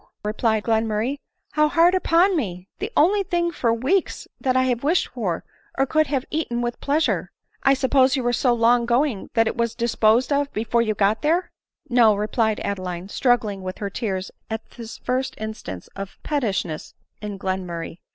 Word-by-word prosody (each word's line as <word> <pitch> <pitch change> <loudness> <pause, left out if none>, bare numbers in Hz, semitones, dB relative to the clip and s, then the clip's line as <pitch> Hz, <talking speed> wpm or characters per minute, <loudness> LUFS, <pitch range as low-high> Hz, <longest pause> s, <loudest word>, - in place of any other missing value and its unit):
replied 215 0 0
Glenmurray, 225 +4 0 0.3
"how 305 0 +3
hard 335 +3 +4
upon 370 +1 +3
me! 185 - -3
the 410 +4 -3
only, 390 +7 +4
thing 345 -3 0
for 240 -7 0
weeks 265 +12 0
that 255 -1 +1
I 260 - +4
have 245 -1 0
wished 330 +5 +2
for, 200 -9 -3 0.3
or 270 - +3
could 310 +2 +2
have 270 -3 -1
eaten 270 -7 -1
with 240 0 -3
pleasure! 300 +3 0 0.3
I 275 - +4
sup 260 -1 -2
pose 265 -1 +5
you 260 - -1
were 240 0 +1
so 245 +1 +2
long 235 0 +3
going 245 -3 +1
that 225 - +4
it - - -1
wag 235 -1 -1
disposed 235 +2 +2
of 280 0 0
be* 215 - -1
fore 235 +1 +2
you 215 -2 0
got 205 +2 +2
there 335 +5 +1
?" - - -69
" - - -37
No," 235 -4 +5
replied 215 +1 0
Adeline, 185 -2 -4
struggling 225 -5 +1
with 185 0 -5
her 200 -1 -4
tears 190 -4 -3 0.2
at 220 0 -5
this 230 -2 -9
first 260 +1 -2
instance 215 - -6
of 195 0 -7
pettishness 200 - -2 0.3
in 210 -2 -5
Glenmurray. 180 -3 -4
235 Hz, 190 wpm, -23 LUFS, 210-280 Hz, 0.3 s, pose